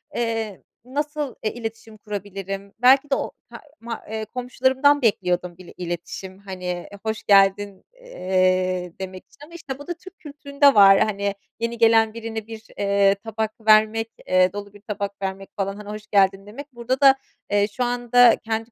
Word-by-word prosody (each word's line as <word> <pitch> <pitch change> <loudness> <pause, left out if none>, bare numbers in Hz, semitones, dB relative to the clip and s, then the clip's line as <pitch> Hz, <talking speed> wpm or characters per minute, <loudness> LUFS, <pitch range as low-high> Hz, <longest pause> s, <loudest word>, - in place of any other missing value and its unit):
eee, 225 -4 -3 0.2
nasıl, 295 +1 -3
eee, 215 - -1
iletişim 225 -1 -8
kurabilirim? 200 -1 -6
Belki 270 +3 +5
de 275 - +3
o - - -3 0.2
ta - - -10 0.2
ma 230 0 -6
eee, 220 0 -4
komşularımdan 260 +4 +1
bekliyordum 180 -5 0
il 185 -2 -13
iletişim, 180 +2 -6
hani 180 -3 -6 0.2
hoş 220 0 -3
geldin, 195 0 +3 0.2
eee, 185 - 0
demek 185 0 -7
için. 275 - -26
Ama, 335 - -18
işte, 280 -5 -7
bu 290 - -11
da 350 - -2
Türk 375 +3 -15
kültüründe 280 -2 +1
var. 195 -1 +8
Hani, 200 -1 0 0.3
yeni 230 0 -3
gelen 225 -1 +4
birine 225 -1 -6
bir, 225 -1 -10
eee, 200 0 +3
tabak 220 +1 -4 0.2
vermek, 220 +1 +4 0.2
eee, 185 0 +3
dolu 205 0 -7
bir 205 - -16
tabak 200 -2 -5
vermek 195 0 -5
falan, 195 0 -2
hani, 210 0 -10
hoş 215 0 -8
geldin 195 -1 +2
demek. 275 +6 -10
Burada 245 +3 -2
da, 270 -1 +8 0.4
eee, 205 0 +3
şu 245 +4 -3
anda 245 0 +4
kendi 225 +1 -4
215 Hz, 165 wpm, -23 LUFS, 195-245 Hz, 0.4 s, var